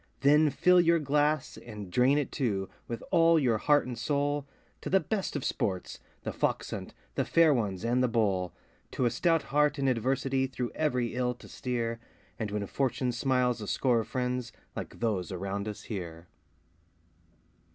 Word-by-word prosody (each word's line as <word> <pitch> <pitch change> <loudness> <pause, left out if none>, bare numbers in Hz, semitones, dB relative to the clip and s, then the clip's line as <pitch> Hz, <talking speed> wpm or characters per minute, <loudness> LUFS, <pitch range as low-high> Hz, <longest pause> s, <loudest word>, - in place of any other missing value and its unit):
Then 150 +2 +5
fill 180 +5 +5
your 170 0 +4
glass, 150 0 +1
and 105 -5 -9
drain 125 +7 +4
it, 145 - -1
too, 100 -8 -1 0.2
with 115 -1 -5
all 165 -2 +5
your 120 -7 +2
heart 145 +3 +3
and 125 -1 -5
soul, 145 +4 -1 0.3
To - - -4
the 190 - +5
best 200 -3 -2
of 145 - -2
sports 95 -2 -2 0.2
The - - -3
Fox - - -1
hunt, - - -6 0.2
The - - 0
Fair 165 -3 +4
Ones, 105 -5 -1
and 120 +2 +2
The 125 - +3
Bowl, 100 -6 +1 0.4
To 125 - 0
a 120 - +2
stout 165 +6 +2
heart 150 0 +2
in 135 -1 0
adversity 130 +2 +1
through 125 -2 -4
every 125 -6 0
ill 125 0 0
to - - -14
steer, 115 -3 -3 0.4
And 110 -2 -2
when 105 0 -2
Fortune 130 +2 -1
smiles 125 -1 +1
a 105 - -5
score 125 +1 +2
of 110 - -3
friends 125 -1 -2 0.2
like - - -7
those 105 -6 -1
around 100 +2 -3
us 105 - -6
here. 85 -6 -6
125 Hz, 175 wpm, -29 LUFS, 110-145 Hz, 0.4 s, Then